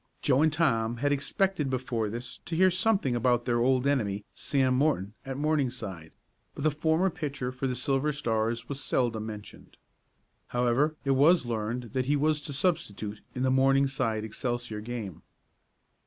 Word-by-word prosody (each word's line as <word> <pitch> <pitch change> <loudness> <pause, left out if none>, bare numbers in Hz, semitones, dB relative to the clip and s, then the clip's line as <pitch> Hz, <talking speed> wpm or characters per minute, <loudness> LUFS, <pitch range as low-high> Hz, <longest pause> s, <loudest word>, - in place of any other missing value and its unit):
Joe 135 0 +3
and 155 0 +4
Tom 120 -8 +1
had 145 +4 0
expected 150 +2 0
before 120 -4 -1
this 120 +4 -6
to 165 - -3
hear 185 +2 +5
something 185 - +1
about 120 0 +2
their 120 -1 +1
old 130 +1 +2
enemy, 105 -8 0
Sam 130 -2 +1
Morton, 130 -8 +1
at 135 -1 -4
Morningside, 130 - -2 0.4
but - - -5
the 155 - +3
former 160 +5 +1
pitcher 140 -6 -4
for 130 +1 -3
the 125 - -2
Silver 135 +3 +1
Stars 115 -4 -1
was 140 0 -5
seldom 115 -5 0
mentioned. 105 -1 -10 0.7
However, 125 +6 +1
it 135 - +2
was 145 +3 +5
learned 115 0 -3
that 130 -1 0
he 145 +3 +2
was 150 +1 +2
to 145 - -6
substitute 110 - -1
in 125 - -1
the 130 - +2
Morningside 135 -4 +2
Excelsior 120 0 -3
game. 110 -6 -6
130 Hz, 160 wpm, -28 LUFS, 115-145 Hz, 0.7 s, hear